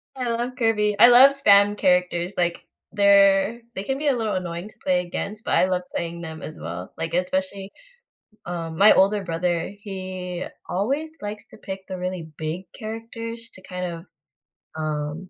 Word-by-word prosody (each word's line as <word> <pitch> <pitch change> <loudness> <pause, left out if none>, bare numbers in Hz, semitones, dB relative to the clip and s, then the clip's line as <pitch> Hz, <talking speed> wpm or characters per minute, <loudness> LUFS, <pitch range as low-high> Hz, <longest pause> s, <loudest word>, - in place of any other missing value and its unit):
I 250 -2 -2
love 235 +2 -1
Kirby. 210 -3 +2
I 240 - +10
love 255 +3 +9
spam 205 -6 +5
characters, 180 -1 +1
like, 175 -1 0 0.3
they're 200 +1 +5 0.2
they 190 - -3
can 270 +5 -2
be 295 - -2
a 280 - +3
little 220 -3 -1
annoying 175 +1 -4
to - - -19
play 180 -1 +2
against, 200 +4 -5
but - - -4
I - - +5
love 185 -1 0
playing 170 0 -4
them 160 -1 -7
as 155 - -8
well, 85 +3 -7
like, 165 0 -4
especially, 190 +2 -1 0.8
um, 165 -2 -4
my 205 +2 +8
older 200 +2 +3
brother, 170 0 -1
he 185 -3 -5 0.2
always 275 - -1
likes 210 0 -5
to - - -14
pick 190 0 -6
the 185 -1 -5
really 180 -2 -4
big 160 +3 -3 0.2
characters 230 +1 -6
to 185 - -11
kind 180 0 -4
of, 170 0 -6 0.7
um, 155 +3 -3
190 Hz, 175 wpm, -24 LUFS, 175-215 Hz, 0.8 s, I